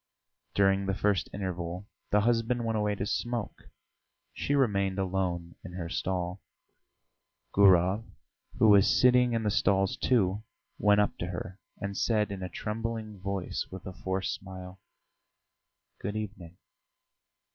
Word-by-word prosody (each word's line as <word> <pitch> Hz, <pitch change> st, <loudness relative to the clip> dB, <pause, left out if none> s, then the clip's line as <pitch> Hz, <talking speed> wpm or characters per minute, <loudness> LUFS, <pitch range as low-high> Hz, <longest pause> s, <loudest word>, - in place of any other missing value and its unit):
During 95 Hz, 0 st, +3 dB
the 95 Hz, -, 0 dB
first 100 Hz, -1 st, +1 dB
interval 90 Hz, 0 st, -4 dB, 0.2 s
the 105 Hz, -, +4 dB
husband 120 Hz, +1 st, +1 dB
went 115 Hz, -1 st, 0 dB
away 105 Hz, -1 st, +1 dB
to 100 Hz, -, -3 dB
smoke; 120 Hz, 0 st, -3 dB, 0.6 s
she 145 Hz, -, -1 dB
remained 100 Hz, -8 st, +2 dB
alone 90 Hz, -3 st, -1 dB
in 90 Hz, -, -9 dB
her 85 Hz, -2 st, -5 dB
stall. 90 Hz, +1 st, -2 dB, 1.1 s
Gurov, 95 Hz, +1 st, +5 dB, 0.5 s
who 110 Hz, -, +5 dB
was 100 Hz, -1 st, +7 dB
sitting 125 Hz, -1 st, +5 dB
in 115 Hz, -1 st, 0 dB
the 105 Hz, -, +1 dB
stalls, 95 Hz, 0 st, +2 dB
too, 105 Hz, -5 st, +2 dB, 0.4 s
went 105 Hz, 0 st, +5 dB
up 105 Hz, -, 0 dB
to 85 Hz, -, -2 dB
her 90 Hz, +1 st, -6 dB, 0.2 s
and 100 Hz, 0 st, -4 dB
said 105 Hz, -2 st, +1 dB
in 100 Hz, -1 st, -5 dB
a 90 Hz, -, -4 dB
trembling 110 Hz, +2 st, -4 dB
voice, 95 Hz, -1 st, -3 dB
with 95 Hz, 0 st, -9 dB
a 95 Hz, -, -6 dB
forced 95 Hz, +1 st, -2 dB
smile: 95 Hz, 0 st, -9 dB, 1.2 s
"Good 105 Hz, +2 st, -4 dB
evening." 95 Hz, -5 st, -6 dB
100 Hz, 135 wpm, -29 LUFS, 95-105 Hz, 1.2 s, was